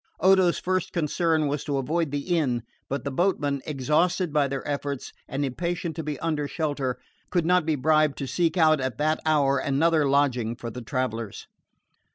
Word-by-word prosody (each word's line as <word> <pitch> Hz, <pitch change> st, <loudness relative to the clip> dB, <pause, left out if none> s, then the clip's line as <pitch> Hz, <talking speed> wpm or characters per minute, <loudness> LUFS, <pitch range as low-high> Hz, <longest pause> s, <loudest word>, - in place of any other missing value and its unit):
Odo's 190 Hz, -2 st, +4 dB
first 185 Hz, -1 st, -1 dB
concern 160 Hz, -1 st, +1 dB
was 140 Hz, 0 st, -2 dB
to 145 Hz, -2 st, -1 dB
avoid 155 Hz, +4 st, 0 dB
the 145 Hz, +5 st, -1 dB
inn; 125 Hz, -8 st, 0 dB, 0.3 s
but 140 Hz, -2 st, -2 dB
the 140 Hz, -, -3 dB
boatmen, 145 Hz, -4 st, 0 dB
exhausted 155 Hz, +4 st, +1 dB
by 145 Hz, -2 st, +3 dB
their 135 Hz, 0 st, -4 dB
efforts 140 Hz, -2 st, -3 dB
and 140 Hz, 0 st, -2 dB
impatient 170 Hz, +4 st, -3 dB
to 160 Hz, -, -3 dB
be 150 Hz, -2 st, -4 dB
under 155 Hz, -3 st, -1 dB
shelter, 145 Hz, -5 st, -2 dB, 0.3 s
could 175 Hz, -3 st, +1 dB
not 180 Hz, -1 st, +3 dB
be 160 Hz, -, +2 dB
bribed 155 Hz, +1 st, +2 dB
to 140 Hz, -, -3 dB
seek 165 Hz, +7 st, 0 dB
out 155 Hz, -3 st, +4 dB
at 130 Hz, -3 st, -3 dB
that 155 Hz, +1 st, +1 dB
hour 140 Hz, -3 st, +3 dB
another 150 Hz, +2 st, +2 dB
lodging 125 Hz, -5 st, +1 dB
for 115 Hz, 0 st, -6 dB
the 125 Hz, -, -7 dB
travellers. 115 Hz, -3 st, -3 dB
150 Hz, 180 wpm, -26 LUFS, 135-165 Hz, 0.3 s, Odo's